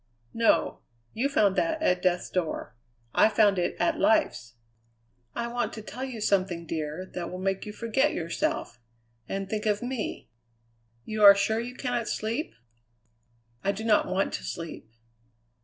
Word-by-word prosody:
"No. 230 0 +2 0.3
You 265 +5 0
found 205 -9 +3
that 325 -1 +1
at 180 - +2
death's 180 -1 0
door; 175 -10 -2 0.4
I - - +5
found 205 -3 +4
it 175 - 0
at 325 -2 +1
life's. 305 - +2 0.8
I 235 - -2
want 235 -2 -2
to 220 - -7
tell 255 +4 -7
you 255 -4 -5
something, 185 -4 +1
dear, 155 +2 -4
that 175 -2 -4
will 180 - -6
make 195 +2 -2
you - - -4
forget 235 +7 +1
yourself 165 -7 -2 0.5
and 195 0 -3
think 215 +2 -2
of 210 +1 +1
me. 245 -3 -4 0.8
You 215 -1 -1
are 200 -1 +11
sure 220 +2 +1
you 245 +2 -5
cannot 245 -3 -2
sleep?" 230 +8 -2 1.1
"I 200 - +2
do 205 +2 -6
not 220 -2 +3
want 190 +2 0
to 60 - -4
sleep." 60 - -7
210 Hz, 155 wpm, -27 LUFS, 185-235 Hz, 1.1 s, are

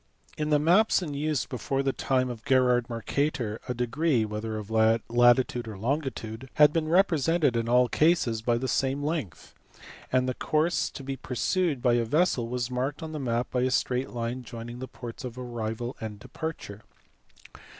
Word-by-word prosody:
In 150 0 -2
the 150 - +4
maps 180 +7 +4
in 150 -4 -5
use 150 -1 -1
before 135 +2 -2
the 135 -1 0
time 130 -2 0
of 115 -2 -9
Gerard 125 -2 +3
Mercator 120 -1 -2
a 125 - -2
degree, 125 +1 +1
whether 110 +1 -4
of 105 0 -7
latitude 120 +2 +3
or 110 -3 -7
longitude, 130 -1 -3
had 150 0 +6
been 160 -2 0
represented 165 -5 +3
in 115 0 -1
all 125 +1 +5
cases 150 -8 +2
by 115 +1 +1
the 130 +2 -2
same 135 +2 0
length, 145 - -4 0.6
and 130 0 +2
the 130 - 0
course 155 +6 0
to 135 - -9
be 135 0 -4
pursued 140 +2 -1
by 120 - +4
a 120 0 +2
vessel 135 -1 +1
was 125 +1 -3
marked 130 +5 -2
on 160 - -5
the 155 - -4
map 120 -2 -1
by 125 - 0
a 130 - +2
straight 130 0 0
line 120 +1 -3
joining 120 0 -8
the 130 - -5
ports 120 +2 -9
of 125 -1 -6
arrival 120 -1 -4
and 110 -2 -5
departure. 110 -4 -7
125 Hz, 180 wpm, -27 LUFS, 115-150 Hz, 0.6 s, had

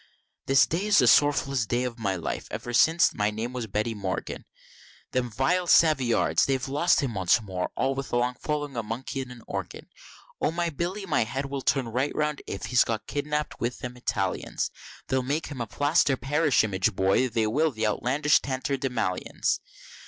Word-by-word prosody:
This 135 0 +5
day 180 +6 -2
is 210 - +4
the - - +6
sorrowfullest 140 -3 +3
day 120 +1 0
of 125 -2 -4
my 100 -4 -1
life, 85 - -4
ever 120 - -5
since 160 +7 +4
my 105 0 +1
name 110 +4 -4
was 125 -3 -4
Betty 105 +3 -1
Morgan, 100 -3 -4 0.7
Them 125 -1 -1
vile 150 - 0
Savoyards! 140 -9 +4
they 135 -1 +2
lost 140 +6 +1
him 135 -5 -2
once 95 -3 +3
before 95 -5 -4
all 135 - +1 0.2
along 120 +1 +1
of - - -32
following 145 -3 -3
a 115 - -1
Monkey 115 +5 -4
and 130 -1 -8
an 120 -2 -12
Organ: - - -6 0.5
O - - +2
my 170 +1 -1
Billy 180 +6 -3
my 180 - +2
head 135 +5 -3
will 140 0 -4
turn 130 -2 +1
right 130 +5 -1
round 150 -1 -1
if 100 - -5
he's 120 +2 +4
got 110 -2 -3
kiddynapp'd 150 +1 -3
with 120 +1 -2
them 125 0 -7
Italians, 125 - -2 0.4
They'll 130 0 +1
make 145 +5 -2
him 135 -5 -6
a 115 - -3
plaster 145 +3 +2
parish 145 +2 +2
image 100 0 0
boy, 95 +8 +2
they 115 -1 0
will, 150 +9 +2
the 110 -5 -3
outlandish 140 +8 +2
tatterdemallions. 130 -7 -1
130 Hz, 185 wpm, -26 LUFS, 115-145 Hz, 0.7 s, the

